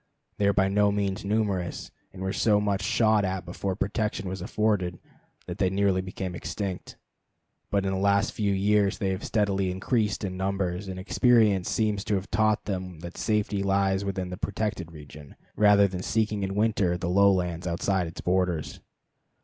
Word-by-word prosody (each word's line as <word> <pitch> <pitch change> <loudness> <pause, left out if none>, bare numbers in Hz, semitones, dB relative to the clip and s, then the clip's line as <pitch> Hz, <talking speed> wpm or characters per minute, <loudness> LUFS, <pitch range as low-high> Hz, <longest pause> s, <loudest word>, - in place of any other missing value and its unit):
They 100 - +3
are 100 - +4
by 95 -1 +3
no 100 +1 +3
means 100 0 -1
numerous, 100 -4 -1 0.2
and 95 -1 -8
were 95 +1 -2
so 105 -2 +3
much 100 -1 0
shot 110 +1 +3
at 95 -1 -2
before 95 +2 -3
protection 105 -1 -2
was 95 0 -5
afforded 95 -3 0 0.5
that 90 +2 -7
they 95 -2 +3
nearly 95 -1 +1
became 95 0 -5
extinct. 90 +3 -5 0.7
But 100 -1 0
in 95 - 0
the 95 - -1
last 100 +2 +2
few 105 -2 0
years 100 0 +2
they 95 - -1
have 95 -1 -3
steadily 100 -3 0
increased 105 +3 -1
in 95 -2 -3
numbers, 95 0 -2
and 95 -1 -5
experience 105 -2 +3
seems 105 -3 0
to 105 - +1
have 95 0 -4
taught 110 -1 +2
them 90 -4 -5
that 85 0 -8
safety 105 -2 0
lies 95 0 +1
within 95 -2 -3
the 90 - -5
protected 100 -5 -3
region, 75 -2 -12 0.2
rather 105 -1 +5
than 90 -1 -5
in - - -6
seeking 110 -2 0
in 95 0 -2
winter 100 -5 +1
the 90 - -4
lowlands 90 -2 +2
outside 90 +1 0
its 80 - -8
borders. 90 -3 -1
95 Hz, 180 wpm, -27 LUFS, 90-105 Hz, 0.7 s, rather